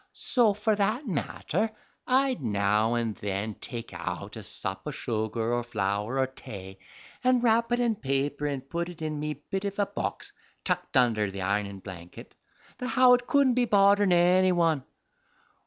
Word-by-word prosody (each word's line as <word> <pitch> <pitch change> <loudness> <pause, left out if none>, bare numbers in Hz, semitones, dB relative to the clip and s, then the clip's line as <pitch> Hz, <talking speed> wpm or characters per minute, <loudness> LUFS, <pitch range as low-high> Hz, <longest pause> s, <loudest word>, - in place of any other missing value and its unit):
So, 230 -6 +2
for 210 +1 +1
that 215 +8 0
matter, 210 +5 -1 0.4
I'd 260 - +2
now 105 0 +1
and 115 -3 -1
then 100 +2 -3
take 115 -1 -6
out - - -5
a - - -7
sup 95 0 -3
o' - - -1
sugar, 115 -3 -2
or 120 - +1
flour, 105 +1 -2
or 135 - +3
tay, 95 -7 -10 0.4
an' 255 -1 +4
wrap 230 0 +2
it 240 - +2
in 235 -2 +2
paper 140 -1 -1
and 135 -2 -4
put 170 +3 -3
it 165 -2 -9
in 155 -1 -3
me 150 0 -3 0.2
bit 195 0 -1
of 200 0 -3
a 205 - +2
box - - -5 0.3
tucked - - -1
under 110 -5 +3
the 95 -1 -5
ironin' 100 0 -2
blankit 90 -3 -10 0.5
the 250 - -3
how 255 -1 +6
it 245 0 +2
cuddent 280 -3 +4
be 250 -1 +3
bodderin' 200 -1 +4
any 180 +2 +5
one. 165 -5 +2
145 Hz, 170 wpm, -28 LUFS, -, 0.5 s, how